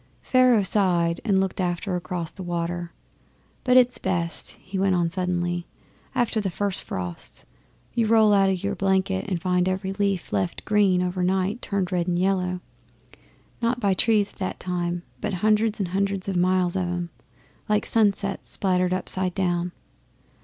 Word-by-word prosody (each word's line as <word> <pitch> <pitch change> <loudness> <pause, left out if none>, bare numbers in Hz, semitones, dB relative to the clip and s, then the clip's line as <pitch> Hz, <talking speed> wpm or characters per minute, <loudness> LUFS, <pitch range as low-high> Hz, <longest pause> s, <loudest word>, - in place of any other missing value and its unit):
Pharaoh 255 -4 +4
sighed 175 -4 +2
and 200 -4 +2
looked 190 0 -1
across 180 -2 -2
the 190 - -10
water. 175 -1 -3 0.7
'But 250 -1 +4
it's 245 -2 +4
best,' 175 -3 -2
he 190 +1 -5
went 190 -1 +3
on 170 -1 +1
suddenly, 175 -1 -1 0.5
'after 230 -2 +1
the 195 - -1
first 195 +2 -1
frosts. 90 -2 -5 0.5
You 230 -2 +1
roll 220 -1 +5
out 195 -1 +4
o' - - +2
your 180 - -2
blanket 190 0 0
and 180 -3 -1
find 180 0 +1
every 190 +1 -2
leaf 200 - -1
left 95 -3 -1
green 200 -4 +3
over 180 0 -2
night 190 +5 0
turned 195 -2 -2
red 175 -1 0
and 175 -1 +1
yellow, 180 -1 0 1.0
not 235 +1 +1
by 200 -4 +2
trees 210 +1 +2
at 185 - -2
a - - -33
time, 175 -1 -2 0.2
but 200 - -2
hundreds 215 0 +3
and 190 -3 -1
hundreds 195 +1 -1
of 195 - -1
miles 180 0 +2
of 190 - +1
'em, 175 -1 -3 0.6
like 210 0 +2
sunsets 200 -3 +1
splattered 185 -1 +1
upside 185 -1 0
down. 175 -2 0
185 Hz, 160 wpm, -25 LUFS, 175-200 Hz, 1.0 s, roll